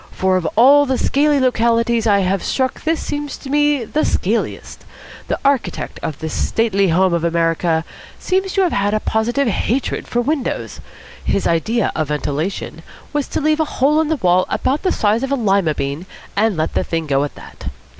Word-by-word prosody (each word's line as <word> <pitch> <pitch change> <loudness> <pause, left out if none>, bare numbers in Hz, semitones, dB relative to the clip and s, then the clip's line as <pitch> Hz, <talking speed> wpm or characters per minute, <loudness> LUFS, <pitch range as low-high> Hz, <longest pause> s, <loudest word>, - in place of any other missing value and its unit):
For 190 0 0
of 180 -3 0
all 280 +5 +6
the 260 -1 0
scaly 290 +2 +2
localities 235 -2 +2
I 200 -2 +4
have 190 0 0
struck 260 -1 -1
this 320 0 +1
seems 290 -1 -4
to 270 - -9
me 295 -2 +2
the 305 +7 -1
scaliest. - - -2 0.4
The - - -1
architect 265 -10 -1
of 150 - -4
this 160 0 -5
Stately 200 -4 +1
Home 185 +2 +2
of 170 -1 0
America 165 -1 +1 0.3
seems 380 +1 -1
to 390 - +2
have 360 -3 +2
had 205 +1 +1
a - - +1
positive 240 +6 0
hatred 235 +5 -1
for 240 - -1
windows. 275 +2 -2 0.4
His 200 - 0
idea 215 +7 +1
of 155 -2 -1
ventilation 150 +5 -3 0.3
was 295 -2 -1
to - - -3
leave 310 +1 +2
a 315 - +2
hole 295 +4 +3
in 320 - -1
the 315 - +1
wall 185 - +2
about 280 +3 0
the 370 - +1
size 215 +2 +1
of 270 0 -3
a - - +3
lima 195 - +1
bean 140 +6 -4 0.3
and 210 -2 +1
let 155 +1 -1
the - - 0
thing 165 -1 -2
go 140 -1 +1
at 145 - -5
that. - - -12
225 Hz, 195 wpm, -18 LUFS, 175-280 Hz, 0.4 s, all